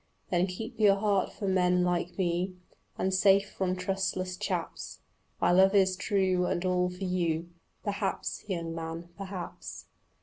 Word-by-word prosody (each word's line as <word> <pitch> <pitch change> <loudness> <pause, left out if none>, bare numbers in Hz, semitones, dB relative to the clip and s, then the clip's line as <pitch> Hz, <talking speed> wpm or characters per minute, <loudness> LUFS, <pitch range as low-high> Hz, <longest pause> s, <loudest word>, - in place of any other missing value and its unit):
Then 180 +1 +3
keep 225 +6 -6
your 205 -2 +6
heart 200 -2 +1
for 200 - -5
men 180 -1 +3
like 175 0 -1
me 180 0 0 0.4
And 190 0 0
safe 195 +1 +4
from 185 -1 -1
trustless 185 -1 -2
chaps. - - -4 0.4
My - - +3
love 190 +2 +5
is 190 -2 +4
true 185 -2 +1
and 175 - -1
all 180 0 +2
for 180 +2 -7
you. 170 -2 0 0.3
"Perhaps, 200 -2 -2
young 165 -3 -2
man, 165 +1 -5
perhaps." 190 -3 -7
185 Hz, 145 wpm, -29 LUFS, 180-195 Hz, 0.4 s, your